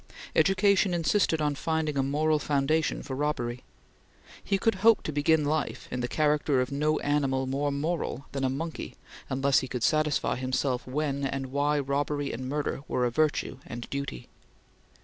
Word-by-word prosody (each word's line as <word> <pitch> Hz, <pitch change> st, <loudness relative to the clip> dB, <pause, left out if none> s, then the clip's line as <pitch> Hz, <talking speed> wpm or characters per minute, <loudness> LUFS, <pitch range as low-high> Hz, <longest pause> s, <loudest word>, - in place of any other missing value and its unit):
Education 195 Hz, -1 st, +3 dB
insisted 165 Hz, -1 st, +2 dB
on 150 Hz, -1 st, +1 dB
finding 160 Hz, +1 st, -1 dB
a 135 Hz, -, +2 dB
moral 150 Hz, +3 st, +1 dB
foundation 150 Hz, +2 st, 0 dB
for 130 Hz, -, -5 dB
robbery. 125 Hz, -4 st, -2 dB, 0.8 s
He 195 Hz, -, +1 dB
could 225 Hz, +3 st, +2 dB
hope 225 Hz, 0 st, +5 dB
to -, -, -3 dB
begin 150 Hz, +1 st, +2 dB
life 155 Hz, 0 st, -2 dB
in 125 Hz, -, -2 dB
the 120 Hz, -, -1 dB
character 150 Hz, -1 st, +2 dB
of 125 Hz, +2 st, -1 dB
no 150 Hz, +2 st, +1 dB
animal 135 Hz, -2 st, +1 dB
more 140 Hz, +2 st, -1 dB
moral 145 Hz, -1 st, -2 dB
than 135 Hz, -1 st, -3 dB
a 130 Hz, -, +2 dB
monkey 160 Hz, +5 st, -5 dB, 0.3 s
unless 135 Hz, +1 st, +3 dB
he 130 Hz, -, -4 dB
could 125 Hz, -2 st, -4 dB
satisfy 155 Hz, -2 st, +2 dB
himself 130 Hz, 0 st, -1 dB
when 140 Hz, +1 st, -1 dB
and 135 Hz, -1 st, -3 dB
why 145 Hz, +2 st, +1 dB
robbery 145 Hz, +1 st, -1 dB
and 130 Hz, +2 st, -5 dB
murder 145 Hz, -1 st, -2 dB
were 125 Hz, -, 0 dB
a 120 Hz, -, 0 dB
virtue 150 Hz, -1 st, 0 dB
and 120 Hz, 0 st, -6 dB
duty. 140 Hz, -, -4 dB
145 Hz, 170 wpm, -28 LUFS, 135-155 Hz, 0.8 s, hope